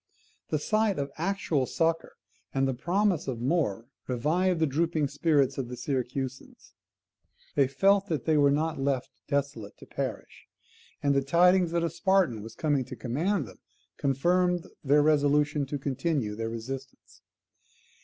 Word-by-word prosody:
The 155 Hz, -, +1 dB
sight 215 Hz, +5 st, +1 dB
of 140 Hz, -1 st, -3 dB
actual 170 Hz, -7 st, 0 dB
succour, 165 Hz, 0 st, 0 dB, 0.4 s
and 135 Hz, 0 st, +2 dB
the 135 Hz, -, 0 dB
promise 180 Hz, +5 st, 0 dB
of 125 Hz, -4 st, -3 dB
more, 120 Hz, -, 0 dB, 0.2 s
revived 165 Hz, +8 st, +1 dB
the 160 Hz, -, +3 dB
drooping 155 Hz, 0 st, 0 dB
spirits 145 Hz, -2 st, +1 dB
of 130 Hz, -, -2 dB
the 125 Hz, 0 st, -7 dB
Syracusans. 130 Hz, 0 st, -4 dB, 0.8 s
They 140 Hz, -2 st, +3 dB
felt 195 Hz, +9 st, +3 dB
that 155 Hz, -9 st, -2 dB
they 160 Hz, -, +3 dB
were 145 Hz, -1 st, +5 dB
not 155 Hz, +1 st, 0 dB
left 135 Hz, -2 st, -1 dB, 0.2 s
desolate 140 Hz, -7 st, -2 dB
to -, -, -13 dB
perish; -, -, -6 dB, 0.6 s
and 140 Hz, -1 st, +3 dB
the 140 Hz, -, +3 dB
tidings 175 Hz, +5 st, +4 dB
that 170 Hz, 0 st, 0 dB
a 170 Hz, -, +1 dB
Spartan 170 Hz, -, +2 dB
was 110 Hz, +2 st, -10 dB
coming 145 Hz, -2 st, +1 dB
to 130 Hz, -, -8 dB
command 145 Hz, -, -1 dB
them 95 Hz, -, -14 dB, 0.4 s
confirmed 175 Hz, +6 st, +1 dB, 0.2 s
their 145 Hz, +1 st, +4 dB
resolution 150 Hz, -1 st, +2 dB
to 145 Hz, -, -3 dB
continue 135 Hz, -4 st, -2 dB
their 115 Hz, +1 st, -3 dB
resistance. 130 Hz, +4 st, -8 dB
145 Hz, 150 wpm, -28 LUFS, 130-170 Hz, 0.8 s, were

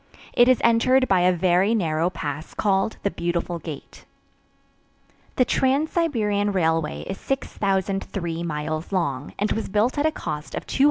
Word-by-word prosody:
It 240 Hz, -, +5 dB
is 255 Hz, -1 st, +5 dB
entered 255 Hz, +3 st, +4 dB
by 190 Hz, -, +3 dB
a 180 Hz, +1 st, +4 dB
very 185 Hz, +4 st, +2 dB
narrow 165 Hz, -4 st, +1 dB
pass 155 Hz, -3 st, -6 dB
called 195 Hz, +1 st, +1 dB
the 200 Hz, -, +1 dB
"Beautiful 170 Hz, 0 st, -2 dB
Gate." 150 Hz, -3 st, -9 dB, 1.3 s
The 255 Hz, -, +3 dB
Trans 270 Hz, +5 st, +1 dB
Siberian 210 Hz, -, +1 dB
Railway 165 Hz, -4 st, 0 dB
is 195 Hz, -, -6 dB
6,003 195 Hz, -8 st, -2 dB
miles 155 Hz, 0 st, -3 dB
long 145 Hz, -7 st, -2 dB
and 210 Hz, +1 st, 0 dB
was 225 Hz, -, -2 dB
built 220 Hz, +8 st, +1 dB
at 300 Hz, -, +3 dB
a -, -, +1 dB
cost 150 Hz, -, -5 dB
of -, -, -5 dB
$201,350,860. -, -, -5 dB
190 Hz, 155 wpm, -24 LUFS, 165-230 Hz, 1.3 s, It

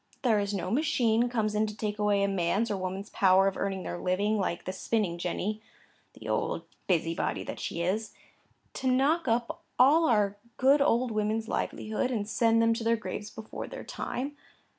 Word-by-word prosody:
There 225 Hz, -5 st, +3 dB
is 200 Hz, 0 st, -1 dB
no 195 Hz, -3 st, -3 dB
machine 245 Hz, -4 st, +2 dB
comes 220 Hz, -3 st, 0 dB
in 215 Hz, +1 st, +1 dB
to 210 Hz, 0 st, -7 dB
take 210 Hz, -1 st, -3 dB
away 205 Hz, -1 st, +2 dB
a -, -, +3 dB
man's 195 Hz, +4 st, 0 dB
or -, -, 0 dB
woman's 190 Hz, +3 st, -5 dB
power 190 Hz, 0 st, +4 dB
of 195 Hz, -, 0 dB
earning 195 Hz, -2 st, -2 dB
their 175 Hz, -, -5 dB
living, 205 Hz, +4 st, +1 dB
like 180 Hz, -3 st, -2 dB
the 185 Hz, -, -3 dB
spinning 190 Hz, -4 st, -1 dB
jenny 205 Hz, +5 st, -2 dB, 0.5 s
(the -, -, -11 dB
old -, -, -1 dB, 0.2 s
busybody 165 Hz, -2 st, 0 dB
that -, -, -6 dB
she 170 Hz, -, -3 dB
is), 210 Hz, +5 st, -1 dB, 0.6 s
to 260 Hz, -, -3 dB
knock 275 Hz, +5 st, +2 dB
up 235 Hz, 0 st, 0 dB, 0.2 s
all 300 Hz, +5 st, +5 dB
our 205 Hz, -3 st, +2 dB, 0.2 s
good 275 Hz, +2 st, +5 dB
old 250 Hz, -2 st, +2 dB
women's 215 Hz, +1 st, -1 dB
livelihood, 220 Hz, +3 st, -2 dB
and 215 Hz, -5 st, -2 dB
send 230 Hz, +1 st, +3 dB
them 230 Hz, 0 st, +4 dB
to 225 Hz, 0 st, -4 dB
their 230 Hz, 0 st, +2 dB
graves 210 Hz, -1 st, -5 dB
before 220 Hz, 0 st, -7 dB
their -, -, -8 dB
time. 280 Hz, +4 st, -4 dB
215 Hz, 185 wpm, -29 LUFS, 195-235 Hz, 0.6 s, all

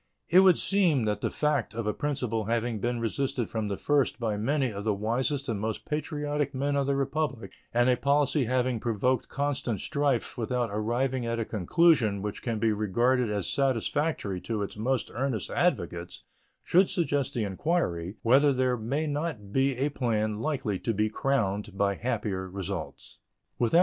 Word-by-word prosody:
It 180 Hz, -, +7 dB
would 190 Hz, -3 st, +6 dB
seem 175 Hz, -, +2 dB
that 105 Hz, -1 st, -1 dB
the -, -, 0 dB
fact 145 Hz, -8 st, 0 dB
of 115 Hz, -1 st, -3 dB
a 105 Hz, -, 0 dB
principle 125 Hz, -7 st, -2 dB
having 115 Hz, 0 st, -1 dB
been 120 Hz, +2 st, -1 dB
resisted 125 Hz, +1 st, -2 dB
from 110 Hz, -2 st, -2 dB
the 100 Hz, -1 st, -3 dB
first 145 Hz, -5 st, +1 dB
by 110 Hz, -3 st, -1 dB
many 130 Hz, +4 st, 0 dB
of 100 Hz, 0 st, -5 dB
the 105 Hz, -1 st, +1 dB
wisest 130 Hz, +7 st, -1 dB
and 110 Hz, -5 st, -2 dB
most 110 Hz, +1 st, -3 dB
patriotic 150 Hz, -2 st, -2 dB
men 140 Hz, +2 st, 0 dB
of 140 Hz, -1 st, +1 dB
the 140 Hz, -, +2 dB
Republic, 140 Hz, -2 st, -2 dB, 0.2 s
and 120 Hz, +1 st, +3 dB
a 125 Hz, -, +5 dB
policy 140 Hz, +1 st, +2 dB
having 125 Hz, 0 st, 0 dB
provoked 120 Hz, +3 st, 0 dB
constant 140 Hz, -6 st, -1 dB
strife 140 Hz, -2 st, -1 dB
without 120 Hz, -1 st, -1 dB
arriving 120 Hz, +4 st, -1 dB
at 115 Hz, 0 st, -1 dB
a 115 Hz, -, -1 dB
conclusion 110 Hz, -, +2 dB
which 105 Hz, -1 st, -4 dB
can 115 Hz, -2 st, -2 dB
be 110 Hz, 0 st, +2 dB
regarded 120 Hz, +4 st, +1 dB
as 100 Hz, -4 st, -1 dB
satisfactory 135 Hz, -, 0 dB
to 110 Hz, -3 st, -2 dB
its 100 Hz, -, -6 dB
most 125 Hz, +4 st, -1 dB
earnest 120 Hz, -5 st, -2 dB
advocates, 85 Hz, +1 st, -1 dB, 0.4 s
should 185 Hz, +2 st, +4 dB
suggest 145 Hz, -8 st, 0 dB
the 115 Hz, -, 0 dB
inquiry 95 Hz, -, -1 dB
whether 135 Hz, +5 st, +5 dB
there 130 Hz, -1 st, +1 dB
may 135 Hz, +8 st, -1 dB
not 145 Hz, -9 st, -3 dB
be 135 Hz, +2 st, +1 dB
a 140 Hz, +3 st, +1 dB
plan 110 Hz, -6 st, -1 dB
likely 120 Hz, -8 st, -1 dB
to 115 Hz, -, -2 dB
be 105 Hz, +1 st, +1 dB
crowned 105 Hz, -6 st, -1 dB
by 100 Hz, 0 st, +2 dB
happier 95 Hz, -5 st, -2 dB
results. 95 Hz, -1 st, -6 dB
120 Hz, 170 wpm, -28 LUFS, 105-140 Hz, 0.4 s, It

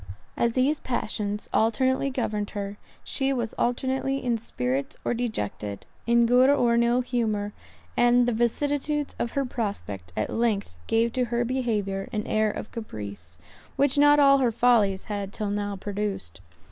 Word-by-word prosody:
As 235 Hz, -1 st, +1 dB
these 270 Hz, +4 st, +2 dB
passions 210 Hz, -4 st, -3 dB
alternately 260 Hz, +5 st, +2 dB
governed 215 Hz, -6 st, -2 dB
her, 200 Hz, 0 st, -4 dB, 0.3 s
she 270 Hz, -1 st, -1 dB
was 235 Hz, -4 st, -2 dB
alternately 265 Hz, +2 st, 0 dB
in 245 Hz, -3 st, 0 dB
spirits 135 Hz, -, -2 dB
or -, -, +1 dB
dejected; 105 Hz, -, -3 dB, 0.2 s
in 235 Hz, 0 st, +5 dB
good 250 Hz, +3 st, +5 dB
or 245 Hz, -5 st, +4 dB
in 235 Hz, -, +4 dB
ill 240 Hz, +1 st, +3 dB
humour; 220 Hz, -5 st, -1 dB, 0.4 s
and 240 Hz, 0 st, +5 dB
the 245 Hz, -, +1 dB
vicissitudes 290 Hz, +5 st, 0 dB
of 235 Hz, -, -2 dB
her 275 Hz, -1 st, 0 dB
prospect 200 Hz, -, -4 dB
at 110 Hz, -, -1 dB
length 215 Hz, -, 0 dB
gave 230 Hz, +1 st, +2 dB
to 255 Hz, -1 st, +1 dB
her 240 Hz, 0 st, 0 dB
behaviour 215 Hz, -6 st, -1 dB
an 215 Hz, -3 st, -2 dB
air 215 Hz, 0 st, +2 dB
of 210 Hz, -, -6 dB
caprice, 100 Hz, -, -7 dB, 0.4 s
which 280 Hz, -1 st, +3 dB
not 290 Hz, 0 st, +6 dB
all 275 Hz, -1 st, +6 dB
her 250 Hz, -3 st, +2 dB
follies 220 Hz, -5 st, +3 dB
had 200 Hz, -2 st, -4 dB
till 210 Hz, -2 st, -3 dB
now 205 Hz, 0 st, -2 dB
produced. 195 Hz, -, -4 dB
230 Hz, 160 wpm, -26 LUFS, 205-255 Hz, 0.4 s, not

